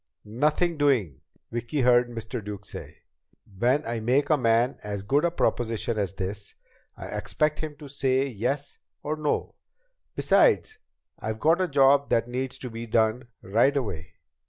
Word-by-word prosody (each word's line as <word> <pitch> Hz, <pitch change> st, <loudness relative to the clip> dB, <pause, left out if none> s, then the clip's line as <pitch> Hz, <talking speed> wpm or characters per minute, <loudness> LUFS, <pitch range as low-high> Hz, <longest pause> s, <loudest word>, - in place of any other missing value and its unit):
"Nothing 150 Hz, +9 st, 0 dB
doing!" 120 Hz, -, +1 dB, 0.3 s
Vicki 120 Hz, +5 st, -2 dB
heard 120 Hz, -1 st, +4 dB
Mr. 115 Hz, 0 st, -6 dB
Duke 100 Hz, -1 st, -7 dB
say. -, -, -10 dB, 0.6 s
"When 130 Hz, +6 st, +2 dB
I 115 Hz, 0 st, -2 dB
make 130 Hz, +7 st, +1 dB
a -, -, +6 dB
man 120 Hz, +1 st, +2 dB
as 100 Hz, -2 st, -5 dB
good 140 Hz, +9 st, +2 dB
a 170 Hz, -, +3 dB
proposition 115 Hz, -8 st, -1 dB
as 95 Hz, -2 st, -2 dB
this, 100 Hz, +2 st, -5 dB, 0.4 s
I -, -, -8 dB
expect 150 Hz, 0 st, -1 dB
him 155 Hz, -2 st, -5 dB
to 145 Hz, -1 st, -11 dB
say 135 Hz, -1 st, +1 dB
yes 135 Hz, +4 st, -3 dB, 0.2 s
or 150 Hz, +1 st, -1 dB
no. 150 Hz, -1 st, -1 dB, 0.6 s
Besides, 435 Hz, -2 st, +3 dB, 0.4 s
I've 110 Hz, 0 st, -4 dB
got 165 Hz, +6 st, +3 dB
a 185 Hz, -, +1 dB
job 140 Hz, -1 st, +4 dB
that 115 Hz, 0 st, +2 dB
needs 130 Hz, +1 st, -3 dB
to 125 Hz, -, -7 dB
be 115 Hz, +1 st, -6 dB
done 110 Hz, +2 st, +1 dB, 0.2 s
right 120 Hz, +9 st, +3 dB
away. 95 Hz, -, -4 dB
125 Hz, 155 wpm, -26 LUFS, 110-145 Hz, 0.6 s, a